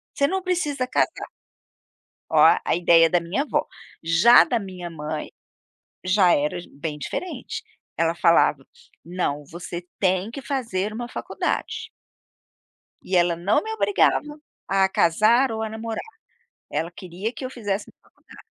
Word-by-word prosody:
"você 280 Hz, -, +2 dB
não 380 Hz, +3 st, -1 dB
precisa 300 Hz, -8 st, -1 dB
casar". 255 Hz, -, -1 dB, 1.0 s
Ó, -, -, +5 dB, 0.2 s
a -, -, +2 dB
ideia 170 Hz, -1 st, +5 dB
da 175 Hz, 0 st, +3 dB
minha 170 Hz, +10 st, -2 dB
avó. 300 Hz, -, -1 dB, 0.3 s
Já 170 Hz, +9 st, +6 dB
da 245 Hz, -, 0 dB
minha 185 Hz, -4 st, -7 dB
mãe, 155 Hz, -1 st, -5 dB, 0.7 s
já 185 Hz, -1 st, +4 dB
era 150 Hz, +4 st, -1 dB
j -, -, -14 dB
bem 150 Hz, +1 st, -6 dB
diferente. 360 Hz, -, -5 dB, 0.3 s
Ela 165 Hz, 0 st, +1 dB
falava: 165 Hz, -5 st, +3 dB, 0.4 s
"Não, 165 Hz, -4 st, -2 dB
você 175 Hz, +1 st, -6 dB, 0.2 s
tem 190 Hz, +2 st, +1 dB
que 270 Hz, +3 st, -8 dB
fazer 215 Hz, -7 st, -2 dB
uma 240 Hz, +2 st, -5 dB
faculdade". -, -, -3 dB, 1.1 s
E 185 Hz, -, -2 dB
ela 175 Hz, -1 st, +3 dB
não 180 Hz, -, +1 dB
me 440 Hz, -, -5 dB
obrigava 305 Hz, -8 st, +1 dB, 0.3 s
a 195 Hz, 0 st, +3 dB
casar 215 Hz, +10 st, +3 dB
ou 220 Hz, 0 st, -3 dB
a 220 Hz, -, -2 dB
namorar. 225 Hz, -, -6 dB, 0.6 s
Ela 160 Hz, +3 st, -2 dB
queria 185 Hz, +6 st, -6 dB
que -, -, -8 dB
eu -, -, -4 dB
fizesse 205 Hz, -5 st, -3 dB, 0.2 s
faculdade. -, -, -18 dB
190 Hz, 140 wpm, -23 LUFS, 170-240 Hz, 1.1 s, Já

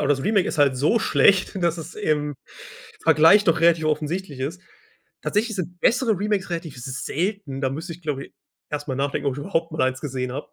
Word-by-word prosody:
aber 145 Hz, -, 0 dB
das 135 Hz, -2 st, +2 dB
Remake 200 Hz, +1 st, +2 dB
ist 160 Hz, -, -4 dB
halt 140 Hz, -3 st, +4 dB
so 155 Hz, -, +3 dB
schlecht, 195 Hz, -2 st, +3 dB
dass 170 Hz, 0 st, +1 dB
es 160 Hz, -, -8 dB
im 150 Hz, -7 st, -1 dB, 0.7 s
Vergleich 165 Hz, +7 st, +6 dB
doch 165 Hz, -, +2 dB
relativ 165 Hz, -1 st, +4 dB
offensichtlich 155 Hz, -1 st, -2 dB
ist. 160 Hz, +7 st, -4 dB, 0.6 s
Tatsächlich 220 Hz, 0 st, 0 dB
sind 175 Hz, -1 st, -5 dB
bessere 230 Hz, -5 st, +2 dB
Remakes 205 Hz, -2 st, -1 dB
relativ 165 Hz, -5 st, -5 dB
selten, 145 Hz, +3 st, -3 dB
da 130 Hz, -2 st, 0 dB
müsste 165 Hz, +5 st, -5 dB
ich, 175 Hz, +2 st, -13 dB
glaube 140 Hz, -3 st, -3 dB
ich, -, -, -25 dB, 0.4 s
erst 145 Hz, 0 st, -4 dB
mal 130 Hz, -, -1 dB
nachdenken, 140 Hz, +1 st, -1 dB
ob 130 Hz, -, -2 dB
ich -, -, -8 dB
überhaupt 165 Hz, 0 st, -2 dB
mal 155 Hz, -, -1 dB
1 130 Hz, 0 st, 0 dB
gesehen 130 Hz, -3 st, -3 dB
habe. 140 Hz, +3 st, -6 dB
160 Hz, 205 wpm, -23 LUFS, 140-190 Hz, 0.7 s, Vergleich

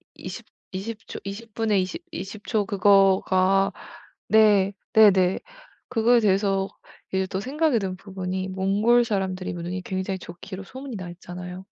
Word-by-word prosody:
20- -, -, -8 dB, 0.3 s
20 215 Hz, +4 st, -6 dB
초 -, -, -6 dB
20 205 Hz, +3 st, -8 dB
분에 215 Hz, -3 st, +1 dB
20- 185 Hz, -, -3 dB
20 205 Hz, +2 st, -7 dB
초 215 Hz, -4 st, +1 dB
그거가 195 Hz, -1 st, +4 dB, 0.6 s
네. 205 Hz, -3 st, +5 dB, 0.2 s
네네 190 Hz, -4 st, +5 dB, 0.5 s
그거에 240 Hz, 0 st, +4 dB
대해서 195 Hz, -2 st, +2 dB, 0.5 s
이제 190 Hz, 0 st, +1 dB
또 190 Hz, -, -3 dB
생각이 280 Hz, +1 st, +1 dB
든 190 Hz, -2 st, -3 dB
부분이 190 Hz, -1 st, -4 dB
몽골 205 Hz, +6 st, +3 dB
사람들이 190 Hz, -4 st, -2 dB
눈이 175 Hz, +2 st, -4 dB
굉장히 190 Hz, 0 st, -3 dB
좋기로 185 Hz, +3 st, -9 dB
소문이 260 Hz, +2 st, -8 dB
나 180 Hz, -2 st, -6 dB
있잖아요. 180 Hz, +1 st, -8 dB
195 Hz, 245 characters per minute, -25 LUFS, 185-215 Hz, 0.6 s, 네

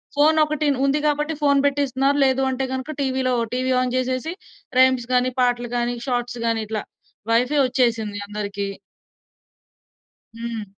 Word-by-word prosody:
Phone 310 Hz, +2 st, +4 dB
ఒకటిన్ 300 Hz, -1 st, 0 dB
ఉంది 275 Hz, +2 st, +2 dB
గాబట్టి 300 Hz, +1 st, +1 dB
phone 280 Hz, -1 st, +4 dB
బెట్టిస్తున్నారు. 280 Hz, 0 st, +1 dB
లేదు 265 Hz, 0 st, +2 dB
అంటే 265 Hz, +1 st, -1 dB
గనక 260 Hz, +3 st, -4 dB
టీవీ‌లో 260 Hz, -1 st, 0 dB, 0.2 s
టీవీ 255 Hz, +1 st, 0 dB
ఆన్ 255 Hz, -, -1 dB
జేసేసి, 255 Hz, +5 st, -1 dB, 0.5 s
రైమ్స్ 260 Hz, -2 st, +4 dB
గాని, 250 Hz, +1 st, +2 dB
పాటలు 245 Hz, -1 st, +1 dB
గాని, 240 Hz, 0 st, -1 dB
షార్ట్స్ 245 Hz, -1 st, -2 dB
గాని, 225 Hz, -1 st, +1 dB
ఇట్లా. 215 Hz, -1 st, -3 dB, 0.5 s
వైఫై 250 Hz, +6 st, +2 dB
ఒచ్చేసింది 230 Hz, -5 st, 0 dB
అందరికి. 200 Hz, -1 st, -4 dB, 1.7 s
హ్మ్. 230 Hz, -2 st, -5 dB
255 Hz, 135 wpm, -22 LUFS, 240-275 Hz, 1.7 s, Phone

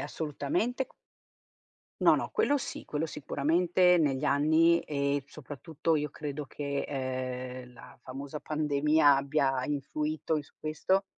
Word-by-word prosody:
assolutamente. 165 Hz, -, -2 dB, 1.2 s
No, -, -, +7 dB
no, -, -, -3 dB
quello 435 Hz, -11 st, +2 dB
sì, 270 Hz, -, -6 dB
quello 150 Hz, +1 st, -2 dB
sicuramente 170 Hz, +4 st, +2 dB
negli 140 Hz, -5 st, +1 dB
anni 160 Hz, +4 st, +4 dB
e, 140 Hz, -1 st, -1 dB
soprattutto 155 Hz, +3 st, -3 dB
io 150 Hz, 0 st, -1 dB
credo 145 Hz, 0 st, -5 dB
che, 140 Hz, 0 st, -3 dB
ehm, 130 Hz, -2 st, -4 dB
la 115 Hz, -, -14 dB
famosa 140 Hz, +3 st, -7 dB
pandemia 150 Hz, -1 st, +3 dB
abbia 135 Hz, -1 st, +1 dB
influito 150 Hz, +2 st, -2 dB
i -, -, -5 dB
su 145 Hz, -, -22 dB
questo, 185 Hz, +5 st, 0 dB
150 Hz, 125 wpm, -30 LUFS, 140-160 Hz, 1.2 s, No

